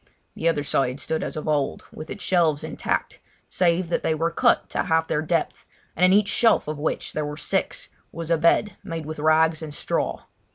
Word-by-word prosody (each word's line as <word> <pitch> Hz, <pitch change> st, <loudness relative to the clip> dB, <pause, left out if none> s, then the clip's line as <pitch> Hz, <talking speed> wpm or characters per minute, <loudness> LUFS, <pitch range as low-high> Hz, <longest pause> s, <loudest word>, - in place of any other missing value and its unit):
The 165 Hz, -, 0 dB
other 145 Hz, -3 st, 0 dB
side 135 Hz, -2 st, 0 dB
stood 160 Hz, 0 st, -2 dB
as -, -, -5 dB
of 155 Hz, -, -5 dB
old, 145 Hz, -3 st, -1 dB
with 155 Hz, -, -9 dB
its 205 Hz, -, -7 dB
shelves 165 Hz, -5 st, +2 dB
intact, 160 Hz, -, -3 dB, 0.3 s
save 175 Hz, -1 st, +1 dB
that -, -, 0 dB
they 160 Hz, -, 0 dB
were 165 Hz, +2 st, 0 dB
cut -, -, +2 dB
to -, -, 0 dB
half 160 Hz, 0 st, +2 dB
their 150 Hz, -, 0 dB
depth, 165 Hz, +1 st, -2 dB, 0.3 s
and 180 Hz, -, 0 dB
in 185 Hz, -, +6 dB
each 205 Hz, +1 st, +4 dB
shelf 230 Hz, -6 st, +3 dB
of 150 Hz, -1 st, -4 dB
which 155 Hz, -, -2 dB
there 155 Hz, -, -1 dB
were 150 Hz, 0 st, -5 dB
six, 150 Hz, -, -2 dB, 0.2 s
was 165 Hz, 0 st, -5 dB
a 165 Hz, -, +4 dB
bed 170 Hz, +6 st, +2 dB
made 165 Hz, -5 st, -5 dB
with 155 Hz, 0 st, -6 dB
rags 155 Hz, +1 st, +3 dB
and 150 Hz, -2 st, -7 dB
straw. -, -, -2 dB
160 Hz, 210 wpm, -24 LUFS, 155-170 Hz, 0.3 s, in